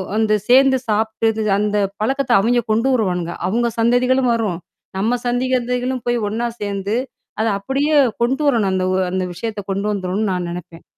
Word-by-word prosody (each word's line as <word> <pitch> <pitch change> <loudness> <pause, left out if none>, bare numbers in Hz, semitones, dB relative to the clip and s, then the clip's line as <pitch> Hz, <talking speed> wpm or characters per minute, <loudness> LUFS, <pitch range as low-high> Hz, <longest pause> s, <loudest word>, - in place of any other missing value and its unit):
வந்து 215 -1 +2
சேர்ந்து 265 +1 +6
சாப்பிட்டு, 220 +1 0 0.2
அந்த 210 0 0 0.3
பழக்கத்த 270 +2 0
அவைங்க 240 +3 +2
கொண்டு 230 +4 +2
வருவானுங்க. 180 -7 -1
அவங்க 235 +5 +1
சந்ததிகளும் 250 +2 +3
வரும், 205 -7 -2 0.4
நம்ம 230 +5 +1
சந்ததிகளும் 250 0 -1
போய் 240 0 +2
ஒன்னா 230 +3 -2
சேர்ந்து, 200 +1 -2 0.4
அத 220 - +1
அப்படியே 280 +8 0 0.3
கொண்டுவரணும், 245 -6 +1
அந்த 185 0 0
ஓ - - +1
அந்த 185 0 -1
விஷயத்த 210 +2 -5
கொண்டுவந்துரணும்ன்னு 200 0 -1
நான் 180 -1 -3
நெனைப்பேன். 170 -1 -9
225 Hz, 140 wpm, -19 LUFS, 200-245 Hz, 0.4 s, சேர்ந்து